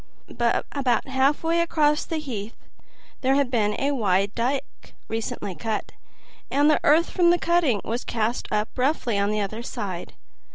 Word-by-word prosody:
About 245 +2 0
halfway 285 +5 +2
across 300 -3 +2
the 325 - -3
heath 230 -8 -5 0.7
there 265 +1 +3
had 275 -3 +1
been 210 -4 +1
a 280 +1 +1
wide 200 -5 +1
dike 255 +4 -3
recently 220 -3 -4
cut, 220 +3 -3 0.6
and 290 +2 +4
the - - +3
earth 320 +4 +4
from 350 -2 +4
the 350 - +5
cutting 335 -11 +2
was 235 +3 -2
cast 230 +1 -1
up 210 0 0
roughly 250 -5 +1
on 200 0 +1
the 210 0 0
other 215 +3 -3
side. 205 -8 -5
250 Hz, 155 wpm, -24 LUFS, 215-295 Hz, 0.7 s, the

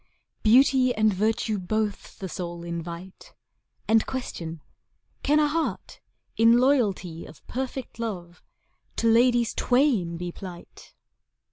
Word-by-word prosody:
Beauty 255 +2 +4
and 215 -1 +3
virtue 215 +1 0
both 210 +2 -3
the 190 - -5
soul 175 -2 -6
invite, 170 +2 -7 0.5
And 225 0 +4
question, 165 - -5 0.6
Can 300 +2 +3
a 300 - +4
heart, 320 +2 -3 0.4
in 230 +1 +6
loyalty 210 - +1
Of 155 - -16
perfect 260 -1 -5
love, 180 -7 -5 0.5
to 230 - 0
ladies 235 0 +4
twain 245 - +1
be 175 0 -5
plight? 180 -1 -11
215 Hz, 115 wpm, -26 LUFS, 175-245 Hz, 0.6 s, in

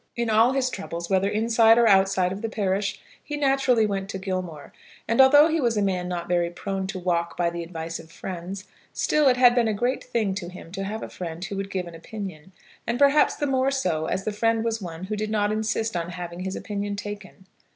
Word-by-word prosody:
In 235 -1 -1
all 225 +4 +5
his 260 -2 0
troubles, 170 -5 -6
whether 190 +1 +3
inside 225 +1 +4
or 235 - +5
outside 190 -2 +4
of 195 +2 -5
the 225 - -2
parish, 200 -1 -1 0.2
he 295 0 -5
naturally 270 -5 +3
went 195 -2 -3
to 190 - -4
Gilmore; 185 -5 -5 0.3
and, 230 +3 +5
although 290 +3 +7
he 325 -1 0
was 235 -3 +1
a - - +2
man 185 -2 -1
not 175 -1 -4
very 175 -1 +1
prone 190 +2 -4
to 190 0 -5
walk 170 -2 -1
by 170 -1 +1
the 170 0 -5
advice 165 -1 -6
of 165 0 -13
friends, 185 +2 -6 0.3
still 300 -2 +2
it 250 -1 +4
had 245 -1 +7
been 240 -2 +2
a 215 - 0
great 245 +5 -1
thing 225 -6 -1
to 185 -3 -5
him 180 -2 -11
to 195 +1 -4
have 215 +3 -4
a - - -5
friend 170 0 -6
who 200 - -5
would 195 0 -4
give 185 -2 -3
an 170 - -10
opinion, 185 -1 -8 0.4
and 235 +1 0
perhaps 285 +2 +4
the 290 - -2
more 265 -1 +2
so, 180 - -1
as 190 - -2
the 215 - -2
friend 225 +2 +1
was 225 -1 -1
one 170 -1 -7
who 210 +3 -3
did 215 +1 -3
not 210 -1 +1
insist 220 0 -1
on 170 0 -2
having 175 0 -7
his 190 +1 -4
opinion 205 -1 -4
taken. 200 -2 -8
200 Hz, 235 wpm, -25 LUFS, 180-230 Hz, 0.4 s, although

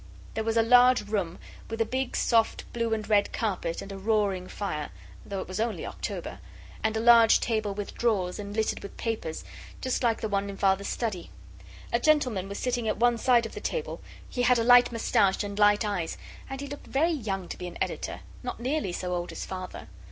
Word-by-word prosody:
There 220 - -2
was 225 +1 0
a 225 - +5
large 245 -1 +5
room, 190 -5 -1 0.3
with 225 0 -4
a 225 - +3
big, 260 +2 -2
soft, 230 -2 +2
blue 230 -1 -1
and 220 -1 -1
red 205 -2 +3
carpet, 185 -7 -2
and 200 - -9
a 195 - -6
roaring 200 -3 +1
fire, 155 -9 -4 0.3
though 195 -1 -4
it - - -7
was 185 +1 -5
only 225 0 -1
October; - - -5 0.4
and 220 0 +1
a - - +1
large 230 -1 +7
table 215 -4 -1
with 205 0 -5
drawers, 200 -6 0
and 205 0 -6
littered 220 -1 0
with 200 - -9
papers, 215 -9 -3 0.4
just 255 -1 -1
like 235 -3 +2
the 220 - -1
one 200 -1 -1
in 195 - -7
Father's 195 0 +2
study. 210 -7 -3 0.6
A 235 - +3
gentleman 250 -10 +2
was 200 - -5
sitting 245 -2 -1
at 215 - 0
one 235 +1 +3
side 240 -1 +4
of 225 - -7
the - - -7
table; 480 0 -3 0.3
he 245 - -3
had 245 0 +4
a 230 - +1
light 245 +1 +7
moustache 220 -4 +2
and 200 0 -5
light 205 +1 +5
eyes, 180 -6 -2 0.3
and 270 0 -5
he - - -4
looked 285 +1 -9
very 315 +6 +2
young 195 - -3
to - - -4
be 180 - -4
an 175 - -8
editor - - -3 0.2
not 250 -2 -5
nearly 260 -4 -1
so 180 +1 -3
old 175 0 -3
as - - -5
Father. 185 -1 -7
220 Hz, 215 wpm, -28 LUFS, 195-240 Hz, 0.6 s, large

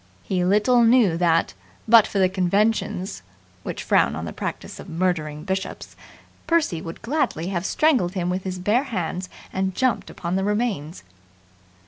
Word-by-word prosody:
He 185 -2 -1
little 210 +6 +3
knew 230 -7 +4
that, 165 -1 +2 0.3
but 225 -1 +7
for - - -4
the 190 -1 +4
conventions 190 - 0 0.4
(which - - -5
frown 70 - +2
on 80 +1 -5
the 80 - -6
practice - - -6
of - - -10
murdering 160 -4 -1
bishops), 190 +1 -4 0.5
Percy 315 - +1
would 165 +4 -8
gladly 230 - -1
have 185 -1 -2
strangled 260 - +2
him 180 -2 -2
with 185 +1 -2
his 185 -1 -4
bare 210 +9 +1
hands 180 - -3 0.2
and 190 -1 -1
jumped 255 -3 0
upon 175 +2 -3
the 190 - 0
remains. 205 - -2
190 Hz, 155 wpm, -23 LUFS, 175-215 Hz, 0.5 s, but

